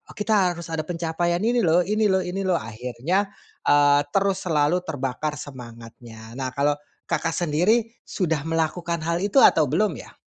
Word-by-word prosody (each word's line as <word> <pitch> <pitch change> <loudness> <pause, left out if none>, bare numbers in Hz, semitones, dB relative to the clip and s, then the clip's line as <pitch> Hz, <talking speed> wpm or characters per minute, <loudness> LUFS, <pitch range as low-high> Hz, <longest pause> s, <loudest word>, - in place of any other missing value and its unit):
kita 205 -4 +1
harus 170 -1 -8
ada 155 -1 -3
pencapaian 175 +2 -1
ini 240 +1 +2
loh, 175 -3 +3
ini 210 +4 +1
loh, 190 -1 +2
ini 180 +2 -4
loh. 180 - +2
Akhirnya, 125 - -2 0.4
eee, 145 0 +5 0.2
terus 195 -1 +2
selalu 155 +2 +2
terbakar 145 +1 -3
semangatnya. 115 -4 -11
Nah, 130 -1 -4
kalau 145 +1 +2 0.3
Kakak 165 0 -1
sendiri 195 +8 +1
sudah 160 -6 -2
melakukan 165 +1 -1
hal 170 +1 -1
itu 205 +6 -1
atau 155 - +6
belum, 205 +9 +1
ya? - - -16
165 Hz, 160 wpm, -23 LUFS, 145-185 Hz, 0.4 s, atau